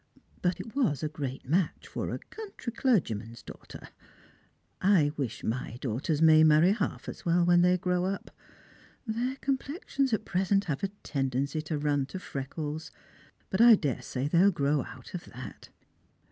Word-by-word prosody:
But 180 0 0
it 230 - -8
was 170 - +1
a - - +1
great 135 -4 -5
match 165 +3 0
for - - -4
a - - -2
country 400 - -8
clergyman's 120 - 0
daughter. - - -11 0.9
I 185 -7 +4
wish 130 -7 -4
iny 120 +1 -3
daughters 140 +6 -1
may 155 -1 +7
marry 155 +4 +6
half 215 - -2
as - - -7
well 175 -1 +3
when 175 0 +5
they 180 +1 +4
grow 180 0 0
up. 195 +1 -4 0.7
Their 240 +3 -1
complexions 275 0 -2
at 220 -1 0
present 195 +2 +1
have 145 -4 -2
a - - +2 0.2
tendency 135 +2 -1
to 155 0 -3
run 145 -2 0
to 190 - -6
freckles; 150 -1 -5 0.6
but 190 - +2
I 235 -1 +9
daresay 140 -4 -2
they'll 175 +6 +5
grow 145 -5 +1
out - - -12
of - - -5
that." - - -10
165 Hz, 160 wpm, -29 LUFS, 140-200 Hz, 0.9 s, I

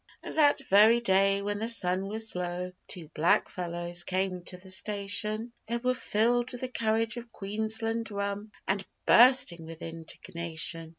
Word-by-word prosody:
And - - -6
that 290 -2 +4
very 215 +4 +6
day, 195 -2 +2
when 205 0 -3
the 225 +2 -2
sun 190 -4 +1
was 220 +2 0
low, 180 0 -4 0.2
Two 170 -4 -6
blackfellows 175 +1 0
came 185 0 -2
to 180 - -7
the 190 +1 -5
station; 210 +3 0
They 235 +1 -1
were 250 +1 0
filled 240 +1 0
with 245 - -8
the 255 - -3
courage 225 -1 0
of 235 -1 -9
Queensland 220 +3 -2
rum 200 +1 -4 0.2
And 195 +1 0 0.2
bursting 250 -9 +6
with 165 0 -10
indignation. 165 0 -4
200 Hz, 155 wpm, -28 LUFS, 180-225 Hz, 0.2 s, very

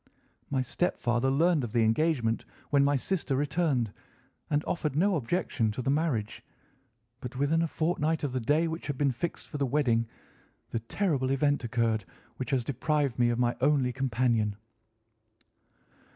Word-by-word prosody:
My 135 -2 0
stepfather 125 -3 0
learned 155 +2 +3
of 115 - -5
the 115 - +3
engagement 115 -1 +1 0.3
when 140 -1 +5
my 140 +1 +3
sister 155 0 -1
returned 145 - 0 0.6
and 145 +1 +1
offered 155 -5 -2
no 190 +5 +3
objection 130 -5 0
to 125 - -4
the 135 - +1
marriage; 140 -9 -1 0.8
but 125 +1 -7
within 145 +5 +2
a 165 - +1
fortnight 160 -1 0
of 140 -3 -1
the 130 - 0
day 150 +8 +2
which 165 +1 -5
had 145 -3 -3
been 140 -1 +2
fixed 145 +8 -4
for 145 - -6
the 140 - +1
wedding, 120 -4 +2 0.6
the 115 - -1
terrible 135 - -1
event 145 0 +1
occurred 115 -2 0 0.3
which 130 - -4
has 130 -4 +1
deprived 140 0 0
me 120 -1 +4
of 120 - 0
my 120 0 +1
only 135 -3 +3
companion." 120 -5 +1
135 Hz, 160 wpm, -29 LUFS, 120-155 Hz, 0.8 s, when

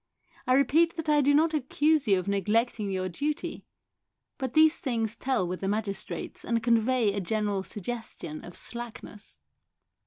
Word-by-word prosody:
I 255 - +4
repeat 310 +6 +4
that 320 -2 -4
I 295 -1 +5
do 285 +1 +3
not 315 +3 +3
accuse 300 0 +1
you 195 -2 +5
of 185 - -3
neglecting 210 +2 0
your 185 -1 -1
duty, 290 - -3 0.7
but 260 -3 -3
these 315 +1 +6
things 230 -5 -2
tell 255 -8 0
with 180 +1 -4
the 195 - -3
magistrates 205 -1 -3
and 230 -1 -1
convey 230 -1 +3
a 200 - -1
general 205 +1 -1
suggestion 210 -6 -6
of 175 - -10
slackness." 235 -3 -7
230 Hz, 155 wpm, -28 LUFS, 200-280 Hz, 0.7 s, these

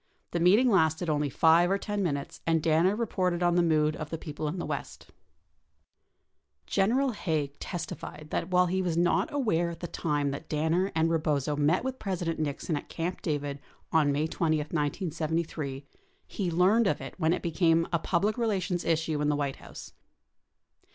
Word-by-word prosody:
The 170 - -1
meeting 205 +9 +5
lasted 160 -2 +2
only 150 -1 0
5 165 +5 +4
or 195 - +2
10 205 0 -3
minutes 140 -6 -3
and 165 -1 +2
Danner 165 +5 +3
reported 185 -6 -1
on 175 0 +3
the 175 - +4
mood 155 -2 +2
of 155 -1 -6
the 165 - -3
people 155 -1 -5
in 155 +5 -3
the 175 - -3
West - - -5 1.6
42 - - -54
General 250 - +2
Haig 155 - -2
testified 155 -3 -6
that 165 - -2
while 180 0 +4
he 185 +2 0
was 175 -3 -1
not 175 +1 +2
aware 210 - +1
at 165 -1 -8
the 175 - -5
time 145 -4 -1
that 140 +3 -7
Danner 160 +5 +1
and 165 +1 +2
Rebozo 150 -3 0
met 150 +7 +2
with 260 0 -4
President 175 -5 -2
Nixon 155 +2 -2
at 145 - -6
Camp 175 +2 -3
David 145 -2 -2 0.3
op 160 -2 +4
May 145 +2 +1
20, 160 -1 0
1973, 155 -2 -2 0.4
he 195 -5 -3
learned 190 +7 +3
of - - 0
it - - -7
when 160 -1 +2
it 180 - -1
became 165 -1 +2
a 170 - +3
public 200 +8 0
relations 190 -6 0
issue 160 -2 0
in 150 - +1
the 150 - +2
White 140 -2 -2
House. - - -11
165 Hz, 180 wpm, -28 LUFS, 150-180 Hz, 1.6 s, meeting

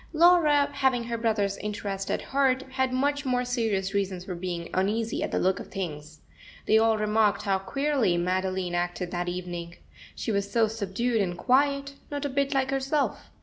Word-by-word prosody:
Laura, 315 -3 +5
having 265 -3 +1
her 235 0 -3
brother's 210 -3 0
interest 200 -2 -4
at - - -1
heart, 265 -1 +1
had 260 -1 0
much 285 +2 0
more 250 -2 0
serious 220 -6 -1
reasons 190 -2 -1
for 185 - -4
being 175 -1 -4
uneasy 215 +4 0
at - - -1
the - - -1
look 185 0 +1
of - - -8
things. 155 -5 -6 0.4
They 220 - +5
all 225 0 +3
remarked 210 -1 +2
how 195 -2 +1
queerly 270 -3 +1
Madeline 185 0 -1
acted 175 0 -2
that 175 0 -2
evening. 175 -1 -5 0.4
She - - -3
was 200 -1 -1
so 230 -1 +4
subdued 220 +2 -1
and 175 -3 -2
quiet, 280 +3 +2 0.2
not 290 0 -3
a - - -1
bit 275 +1 0
like 265 0 +1
herself. 275 +2 -1
215 Hz, 180 wpm, -27 LUFS, 185-265 Hz, 0.4 s, Laura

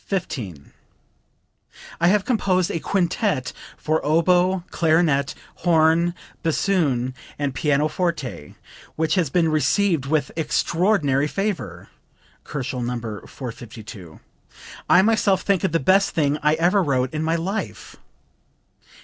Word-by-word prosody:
"I 170 - +5
have 200 +2 +3
composed 185 -7 +1
a 165 - -2
Quintet 180 - -1 0.2
for 155 +1 -1
Oboe, 175 +4 +2
Clarinet, 155 -3 +2 0.2
Horn, 170 +1 +3 0.3
Bassoon 150 -7 0 0.2
and 145 -2 -2
Pianoforte, 150 - -1 0.4
which 160 0 0
has 180 -7 +1
been 165 +2 +2
received 155 +1 +1
with 145 -2 0
extraordinary 160 -2 +1
favor. 195 +3 -4 0.5
(Kochel, 130 -3 -4
No. 125 +1 -2
452.) 110 - -9 0.7
I 185 - +6
myself 205 -3 +2
think 200 -2 +1
it 190 - +1
the 165 - +1
best 195 +7 +3
thing 150 -1 +1
I 150 +1 +3
ever 175 +5 +3
wrote 130 -5 0
in 155 - -2
my 160 +1 0
life." 190 +6 -4
160 Hz, 110 wpm, -22 LUFS, 140-185 Hz, 0.7 s, I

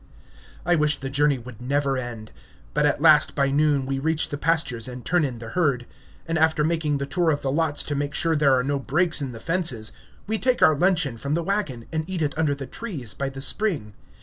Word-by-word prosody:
I 175 - +3
wish 150 -2 +2
the 135 -1 -5
journey 145 0 +2
would 120 -2 -11
never 140 +2 0
end; 120 -4 -6 0.4
but 150 0 +3
at 145 +1 -1
last, 155 -2 +5
by 140 -1 +1
noon, 145 -1 +2
we 135 0 -2
reach 160 +2 0
the 145 - -4
pastures 150 -9 0
and 125 -1 -8
turn 175 -1 +2
in 130 -4 -2
the 115 0 -8
herd; 140 -8 0 0.4
and 165 -1 0
after 160 -1 +3
making 155 -2 0
the 140 - -3
tour 170 +4 0
of 145 -2 0
the 135 - -1
lots 150 0 +1
to 145 - -4
make 145 0 -2
sure 165 -1 +1
there 140 -3 +4
are 125 - +1
no 140 +1 -1
breaks 155 +4 +1
in 135 -2 -3
the 115 - -9
fences, 160 -9 0 0.3
we 220 +1 -1
take 255 -1 +2
our 155 - +6
luncheon 155 -7 +1
from 140 +5 -2
the 170 - -1
wagon 165 - -2
and 160 +2 -2
eat 180 -4 -2
it 145 - -2
under 155 -3 +1
the 140 -1 -7
trees 145 - -5
by 135 -1 -3
the 135 0 -8
spring. 145 - +1
145 Hz, 230 wpm, -24 LUFS, 135-160 Hz, 0.4 s, our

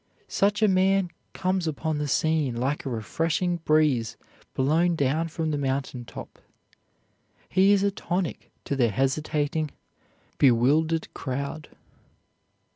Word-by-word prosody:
Such 205 +2 +1
a - - +6
man 190 -1 +2 0.2
comes 185 -2 -1
upon 155 0 -2
the 150 - -1
scene 155 -4 +1
like 135 +4 -2
a - - -1
refreshing 165 - -1
breeze 150 -8 +1 0.4
blown 165 +6 +2
down 155 +3 +1
from 160 -1 -3
the 145 - -1
mountain 135 -2 -2
top. - - -10 1.1
He 190 +2 +4
is 200 -1 +4
a 200 - +2
tonic 180 -2 -3 0.2
to 140 - -1
the 120 -4 +3
hesitating, 145 +5 0 0.7
bewildered 145 +6 +3
crowd. 140 +3 -4
155 Hz, 120 wpm, -26 LUFS, 135-175 Hz, 1.1 s, a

